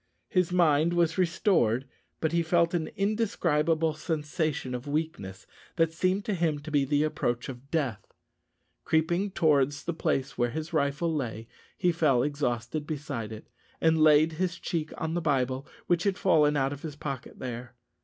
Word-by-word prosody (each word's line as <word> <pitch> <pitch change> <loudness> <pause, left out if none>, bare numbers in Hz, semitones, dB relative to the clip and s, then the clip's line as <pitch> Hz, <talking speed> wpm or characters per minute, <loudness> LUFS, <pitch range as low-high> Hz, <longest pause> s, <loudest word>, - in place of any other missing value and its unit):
His 180 -2 +1
mind 165 -2 +3
was 170 0 +1
restored, 170 - +2 0.4
but 160 - +1
he 170 0 +2
felt 170 +1 +2
an 165 -3 0
indescribable 165 -7 +1
sensation 150 -3 -2
of 125 +3 -5
weakness, 145 - -3 0.3
that 165 -1 +2
seemed 185 +4 0
to 210 - -1
him 165 -4 +1
to 155 +1 -8
be 145 -2 +3
the 145 +2 +2
approach 120 -5 -1
of 130 +1 -9
death. 140 -10 -1 0.8
Creeping 170 +5 +1
towards 145 -5 +2
the 170 - -2
place 145 -6 -1
where 120 0 +2
his 160 +5 -5
rifle 150 +2 +1
lay, 115 -6 -3 0.3
he 180 -4 +2
fell 150 -7 +3
exhausted 140 0 -2
beside 140 -8 -4
it, 110 0 -9 0.3
and 160 -1 +3
laid 155 +1 +6
his 180 +2 -2
cheek 160 -3 -3
on 160 0 -2
the 175 - -1
Bible, 135 -3 0 0.2
which 175 +1 +1
had 195 -2 +1
fallen 150 -1 +3
out 135 0 +1
of 145 - -9
his 155 -3 -6
pocket 140 -4 -6
there. 125 0 -6
155 Hz, 165 wpm, -28 LUFS, 135-170 Hz, 0.8 s, laid